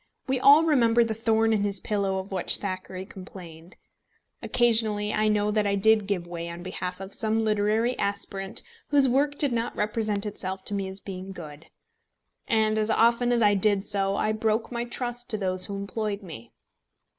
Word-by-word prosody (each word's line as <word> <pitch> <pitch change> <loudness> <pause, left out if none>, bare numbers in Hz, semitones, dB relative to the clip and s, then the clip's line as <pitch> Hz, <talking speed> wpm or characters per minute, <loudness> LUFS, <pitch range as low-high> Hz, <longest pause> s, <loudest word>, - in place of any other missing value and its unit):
We 265 -1 0
all 285 +5 +7
remember 240 -7 +4
the 225 -1 -2
thorn 225 0 +1
in 210 - +1
his 200 -1 0
pillow 200 -2 -1
of 190 +1 -6
which 185 -2 +3
Thackeray 185 -1 -5
complained. 180 -3 -12 0.7
Occasionally 220 -3 +2
I 215 0 +1
know 210 0 +1
that 210 -1 +1
I 200 - +1
did 215 +1 +3
give 190 -4 -1
way 170 -1 -6
on 170 +1 -8
behalf 180 0 -5
of 195 0 -8
some 220 0 0
literary 215 +3 +1
aspirant 200 -1 -3 0.2
whose 280 -2 +4
work 285 +3 +1
did 285 -5 -1
not 230 0 -2
represent 210 -1 -1
itself 190 -2 -5
to - - -3
me 195 -1 -2
as 190 +1 -5
being 190 -1 -8
good; 155 -3 -10 0.8
and 220 -1 +2
as 215 0 0
often 235 +2 +3
as 235 -2 +2
I 205 -1 +5
did 200 0 +2
so, 195 -1 0
I 215 - 0
broke 220 +1 -1
my 240 0 -3
trust 245 0 -5
to 215 - -1
those 185 -2 +1
who 200 - -5
employed 200 +1 -4
me. 120 -10 -10
210 Hz, 185 wpm, -26 LUFS, 190-225 Hz, 0.8 s, all